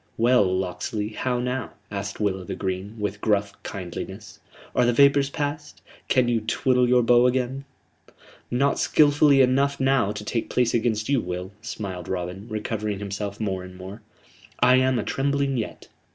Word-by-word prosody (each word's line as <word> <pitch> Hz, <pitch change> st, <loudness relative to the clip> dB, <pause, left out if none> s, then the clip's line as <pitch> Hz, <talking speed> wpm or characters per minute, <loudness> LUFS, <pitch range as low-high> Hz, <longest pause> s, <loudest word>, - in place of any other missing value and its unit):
"Well, 120 Hz, 0 st, +4 dB
Locksley, 95 Hz, +4 st, -2 dB
how 125 Hz, +3 st, -2 dB
now?" 125 Hz, -1 st, -3 dB, 0.2 s
asked 100 Hz, 0 st, -5 dB
Will 100 Hz, -3 st, 0 dB
o' -, -, -8 dB
th' -, -, -6 dB
Green, 95 Hz, +3 st, -4 dB
with 105 Hz, -1 st, -3 dB
gruff 100 Hz, -1 st, +1 dB
kindliness. 90 Hz, -4 st, -7 dB, 0.4 s
"Are 125 Hz, -, +4 dB
the 120 Hz, 0 st, +3 dB
vapors 140 Hz, +2 st, +5 dB
passed? 145 Hz, 0 st, -5 dB, 0.2 s
Can 130 Hz, -2 st, +3 dB
you 120 Hz, -2 st, +1 dB
twiddle 125 Hz, +3 st, +1 dB
your 125 Hz, -1 st, +4 dB
bow 120 Hz, +1 st, +5 dB
again?" 130 Hz, +2 st, -1 dB, 0.8 s
"Not 140 Hz, +3 st, +1 dB
skilfully 145 Hz, -2 st, +5 dB
enough 140 Hz, +2 st, +2 dB
now 135 Hz, -6 st, +2 dB
to 105 Hz, 0 st, -7 dB
take 115 Hz, +1 st, -2 dB
place 125 Hz, -2 st, +1 dB
against 110 Hz, -2 st, 0 dB
you, 140 Hz, -3 st, +2 dB
Will," 90 Hz, +1 st, -5 dB
smiled 95 Hz, -6 st, -6 dB
Robin, 90 Hz, +3 st, -4 dB
recovering 105 Hz, -1 st, -3 dB
himself 100 Hz, 0 st, -5 dB
more 95 Hz, -4 st, -2 dB
and 90 Hz, 0 st, -11 dB
more. 95 Hz, +4 st, -9 dB, 0.6 s
"I 125 Hz, +1 st, +5 dB
am 130 Hz, 0 st, +3 dB
atrembling 135 Hz, +3 st, 0 dB
yet. 110 Hz, -, -6 dB
115 Hz, 160 wpm, -24 LUFS, 100-130 Hz, 0.8 s, vapors